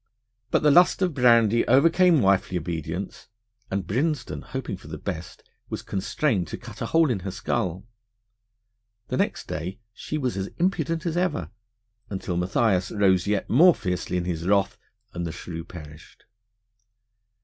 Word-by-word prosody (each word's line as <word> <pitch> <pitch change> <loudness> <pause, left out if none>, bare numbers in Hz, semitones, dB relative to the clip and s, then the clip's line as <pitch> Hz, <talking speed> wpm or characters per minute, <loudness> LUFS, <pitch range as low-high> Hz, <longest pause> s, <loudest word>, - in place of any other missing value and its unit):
But - - +1
the 150 - +6
lust 180 +4 +5
of 180 -3 +1
brandy 115 -3 +4
overcame 165 +4 +5
wifely 95 -1 +2
obedience, 85 +2 -5 0.4
and 95 -1 -2
Brinsden, 130 - -1
hoping 135 -6 -5
for 90 - -14
the 80 0 -6
best, 85 0 -6 0.3
was - - -5
constrained 105 - -1
to - - -6
cut 115 -3 -11
a 115 - -1
hole 165 -1 +3
in 110 - -1
her 95 - -5
skull. 95 -1 -2 1.2
The - - -1
next - - -1
day 85 +6 -4 0.2
she 155 - -5
was 130 -7 -2
as 95 0 -2
impudent 165 -2 0
as 170 0 -1
ever, 175 -4 -1 0.6
until 95 -2 -4
Matthias 95 +1 +1
rose 95 -3 +2
yet 105 -1 0
more 170 +8 +6
fiercely 90 -1 -2
in 90 - -2
his 85 -1 -3
wrath, 100 -1 +2 0.4
and 85 - -4
the - - -4
shrew 85 -1 -7
perished. 75 -3 -13
100 Hz, 155 wpm, -25 LUFS, 90-140 Hz, 1.2 s, the